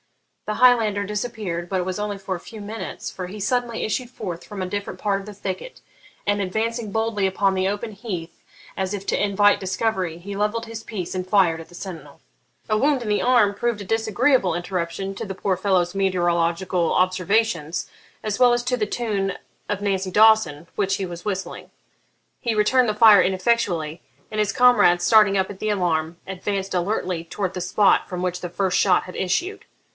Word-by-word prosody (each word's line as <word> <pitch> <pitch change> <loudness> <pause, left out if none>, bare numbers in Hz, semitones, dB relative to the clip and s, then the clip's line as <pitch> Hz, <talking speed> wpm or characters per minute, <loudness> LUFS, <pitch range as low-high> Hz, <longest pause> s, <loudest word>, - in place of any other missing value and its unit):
The 215 - -1
Highlander 220 -5 +4
disappeared, 205 -5 -4
but 190 - 0
it 180 - -2
was 185 +1 -3
only 205 -1 -3
for 195 -1 -4
a - - -7
few 220 - -10
minutes, 210 +2 -6
for 180 -1 -6
he 205 +4 -8
suddenly 240 +2 -1
issued 240 +3 -2
forth 190 -9 -6
from 205 -2 -7
a - - -1
different 200 +2 -5
part 200 -2 0
of - - -12
the 210 - -7
thicket, 195 - -6 0.5
and, 205 0 +2
advancing 220 +3 -2
boldly 220 -2 0
upon 195 +1 +1
the 190 0 +1
open 205 +3 -4
heath 185 -6 -6 0.3
as 190 +1 -2
if 195 -1 -7
to - - +1
invite 205 0 +3
discovery, 190 -3 -1
he 200 +4 -7
levelled 210 +3 -1
his 225 -1 -8
piece 185 -6 -5
and 185 0 -2
fired 180 -5 +3
at 165 - -13
the 175 - -14
sentinel. 165 -7 -9 0.5
A 215 - +2
wound 275 +2 +2
in - - -6
the 210 - +2
arm 240 -5 +4
proved 235 +1 -1
a 200 - -7
disagreeable 220 - +2
interruption 180 +2 -3
to - - -5
the 195 -1 -6
poor 190 0 0
fellow's 185 -2 +1
meteorological 175 -2 +1
observations, 185 -2 +1 0.4
as 215 0 -2
well 250 -1 +6
as 240 0 +1
to 250 +1 0
the 215 -4 -1
tune 205 -4 -1 0.4
of 205 -1 -2
'Nancy 195 -2 -1
Dawson,' 210 -8 +4
which 195 -1 +1
he 195 - -3
was 175 -1 -8
whistling. 195 -2 -4 0.7
He 235 -3 -1
returned 240 +3 +3
the 210 - -1
fire 215 -3 +8
ineffectually, 185 -5 0 0.3
and 215 - -4
his 210 -1 +2
comrades, 245 -8 +5
starting 210 -3 +5
up 190 0 0
at 195 - -11
the 215 - -2
alarm, 170 -4 0
advanced 195 +1 -3
alertly 180 -2 -1
towards 185 +2 -3
the 180 - -4
spot 195 +3 +3
from 180 -1 -4
which 180 0 -2
the 175 - -4
first 185 +1 0
shot 185 -3 +4
had 180 - -10
issued. 350 - -1
195 Hz, 195 wpm, -23 LUFS, 180-215 Hz, 0.7 s, fire